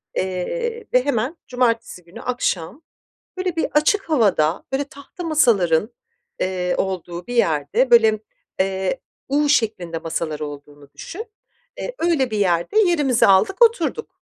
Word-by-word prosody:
Eee, 450 Hz, -, -3 dB
ve 255 Hz, +1 st, +4 dB
hemen, 270 Hz, +4 st, -1 dB
cumartesi 230 Hz, -6 st, -1 dB
günü, 170 Hz, +2 st, -12 dB
akşam 245 Hz, -, -2 dB, 0.6 s
böyle 370 Hz, -2 st, -2 dB
bir 325 Hz, -, +1 dB
açık 330 Hz, +6 st, +2 dB
havada, 195 Hz, -, +2 dB
böyle, 270 Hz, +2 st, 0 dB
tahta 280 Hz, +5 st, -11 dB
masaların, 220 Hz, -, +3 dB, 0.5 s
eee, 180 Hz, -1 st, -1 dB
olduğu 180 Hz, -2 st, -3 dB
bir 245 Hz, -, -4 dB
yerde, 160 Hz, -, +1 dB
böyle, 220 Hz, -2 st, +6 dB, 0.4 s
eee, 190 Hz, +4 st, 0 dB, 0.3 s
U 290 Hz, +1 st, +2 dB
şeklinde 215 Hz, -, +1 dB
masalar 160 Hz, -2 st, -3 dB
olduğunu 145 Hz, -1 st, -9 dB
düşün, 430 Hz, +6 st, -8 dB, 0.5 s
eee, -, -, -5 dB
öyle 315 Hz, -8 st, +1 dB
bir 215 Hz, -, -1 dB
yerde 180 Hz, -, +2 dB
yerimizi 300 Hz, -, +3 dB
aldık 200 Hz, -, +3 dB
oturduk. 460 Hz, 0 st, 0 dB
230 Hz, 130 wpm, -21 LUFS, 180-300 Hz, 0.6 s, böyle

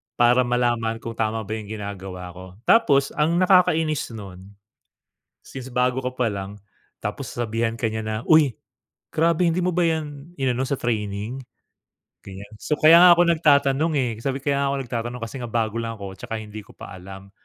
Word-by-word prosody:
para 120 Hz, +1 st, +4 dB
malaman 120 Hz, -2 st, 0 dB
kung 115 Hz, -, -5 dB
tama 110 Hz, 0 st, -2 dB
ba 105 Hz, -, -10 dB
yung 105 Hz, -, -9 dB
ginagawa 95 Hz, -4 st, -7 dB
ko. 90 Hz, +1 st, -11 dB, 0.2 s
Tapos 140 Hz, -11 st, +4 dB
ang 155 Hz, +3 st, +1 dB
nakakainis 165 Hz, -8 st, +2 dB
nun, 95 Hz, -3 st, -10 dB, 1.0 s
since 130 Hz, -1 st, -9 dB
bago 125 Hz, 0 st, 0 dB
ka 125 Hz, 0 st, -4 dB
pa 125 Hz, -2 st, +1 dB
lang, 100 Hz, 0 st, -6 dB, 0.5 s
tapos -, -, -4 dB
sasabihan 115 Hz, -1 st, -2 dB
ka 115 Hz, -, -2 dB
niya 110 Hz, 0 st, -3 dB
na, 110 Hz, 0 st, -3 dB
"Uy, 150 Hz, -7 st, +4 dB, 0.5 s
grabe 165 Hz, +2 st, +1 dB
hindi 165 Hz, +2 st, 0 dB
mo 180 Hz, -, +1 dB
ba 180 Hz, -, +2 dB
yan 155 Hz, -2 st, -2 dB
inano 130 Hz, -2 st, 0 dB
sa 135 Hz, 0 st, -2 dB
training?" 110 Hz, +2 st, -3 dB, 0.8 s
Ganiyan. 100 Hz, +2 st, -11 dB
So, 150 Hz, +7 st, -3 dB
"Kaya 160 Hz, +2 st, +8 dB
nga 180 Hz, -, +9 dB
ako 175 Hz, -, +3 dB
nagtatanong, 155 Hz, -1 st, +3 dB
eh," 125 Hz, -2 st, 0 dB
sabi 135 Hz, 0 st, -2 dB
ko. 140 Hz, -, -13 dB
"Kaya 140 Hz, 0 st, +1 dB
nga -, -, +1 dB
ako -, -, -1 dB
nagtatanong 120 Hz, +1 st, -4 dB
kasi 115 Hz, -, -10 dB
nga 120 Hz, -, -5 dB
bago 110 Hz, -1 st, -1 dB
lang 115 Hz, 0 st, -4 dB
ako 95 Hz, -1 st, -7 dB
tsaka 110 Hz, +4 st, -6 dB
hindi 110 Hz, 0 st, -9 dB
ko -, -, -18 dB
pa -, -, -11 dB
alam." 95 Hz, +1 st, -11 dB
120 Hz, 185 wpm, -23 LUFS, 110-140 Hz, 1.0 s, nga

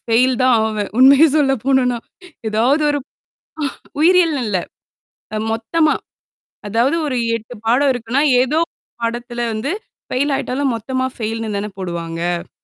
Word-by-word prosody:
Fail 250 Hz, +3 st, +2 dB
தான் 255 Hz, -1 st, +5 dB
ஆவேன். 215 Hz, -2 st, -2 dB
உண்மையே 275 Hz, +4 st, +7 dB
சொல்ல 275 Hz, -3 st, +3 dB
போனும்னா. 255 Hz, -3 st, +2 dB, 0.5 s
எதாவது 250 Hz, +8 st, +2 dB
ஒரு 290 Hz, -, 0 dB, 1.0 s
உயிரியல்னு 330 Hz, -4 st, +4 dB
இல்ல. 190 Hz, -3 st, 0 dB, 0.8 s
அ, -, -, -1 dB, 0.2 s
மொத்தமா. 305 Hz, +8 st, +1 dB, 0.7 s
அதாவது, 235 Hz, +9 st, +2 dB
ஒரு 260 Hz, -, -1 dB, 0.2 s
8 230 Hz, +2 st, -10 dB
பாடம் 265 Hz, +5 st, +3 dB
இருக்குன்னா, 245 Hz, +4 st, 0 dB, 0.2 s
ஏதோ 300 Hz, +5 st, +1 dB
1 -, -, -73 dB, 0.3 s
பாடத்துல 240 Hz, +1 st, -3 dB
வந்து 225 Hz, +9 st, -2 dB, 0.4 s
ஃபெயில் 280 Hz, +3 st, +1 dB
ஆயிட்டாலும், 265 Hz, 0 st, -1 dB
மொத்தமா 260 Hz, +3 st, -2 dB
ஃபெயில்னு 225 Hz, -1 st, -3 dB
தானே 210 Hz, +1 st, -4 dB
போடுவாங்க. 170 Hz, 0 st, -3 dB
245 Hz, 130 wpm, -19 LUFS, 220-275 Hz, 1.0 s, உண்மையே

